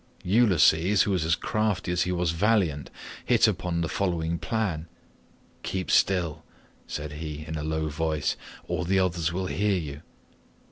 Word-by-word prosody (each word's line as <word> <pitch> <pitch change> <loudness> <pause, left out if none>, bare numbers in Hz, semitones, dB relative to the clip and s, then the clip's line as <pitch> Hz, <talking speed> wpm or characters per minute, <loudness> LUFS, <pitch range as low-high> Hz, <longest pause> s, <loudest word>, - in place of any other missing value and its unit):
"Ulysses, 95 -3 +4
who 105 - -1
was 90 -4 +1
as 80 +1 +3
crafty 105 -4 -1
as 90 0 +1
he 90 - 0
was 90 -2 0
valiant, 85 -6 +1 0.3
hit - - +4
upon 85 -2 -1
the 85 - 0
following 85 -2 -1
plan: 95 -8 -2 0.7
"'Keep 95 -1 -3
still,' 85 -5 +2 0.4
said 75 0 -5
he 75 0 -6
in 80 - -4
a 75 - -3
low 80 0 -1
voice, 75 0 -1 0.3
'or - - -1
the 95 +3 +1
others 85 -3 +1
will 95 +2 -2
hear 100 +1 +1
you. 75 -4 -6
85 Hz, 155 wpm, -27 LUFS, 80-95 Hz, 0.7 s, Ulysses